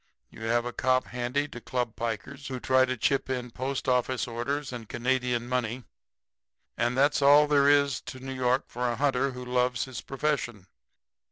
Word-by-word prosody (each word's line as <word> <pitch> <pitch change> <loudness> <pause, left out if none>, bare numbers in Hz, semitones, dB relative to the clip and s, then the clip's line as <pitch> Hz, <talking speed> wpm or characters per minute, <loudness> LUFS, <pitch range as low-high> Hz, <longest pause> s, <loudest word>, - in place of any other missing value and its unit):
You - - -13
have 120 +1 +1
a 120 - -4
cop 130 0 +2
handy 125 +4 -2
to 120 - -9
club 125 -2 -2
pikers 120 +5 -4
who 130 -2 -4
try 130 +1 +4
to 130 0 -3
chip 135 +4 +1
in 125 -2 -3
post 130 +3 -3
office 125 0 +1
orders 130 +4 -3
and 115 -3 -7
Canadian 125 -1 0
money, 125 0 -2 0.9
and 120 +2 0
that's 145 +2 +3
all 145 +2 +7
there 145 -1 +4
is 140 -2 +3
to 130 - -8
New 130 +1 -6
York 130 0 +1
for 125 0 -2
a 120 - -1
hunter 135 0 +1
who 125 0 -7
loves 125 -2 +1
his 130 -3 -7
profession. 135 -8 -2
125 Hz, 180 wpm, -28 LUFS, 120-135 Hz, 0.9 s, all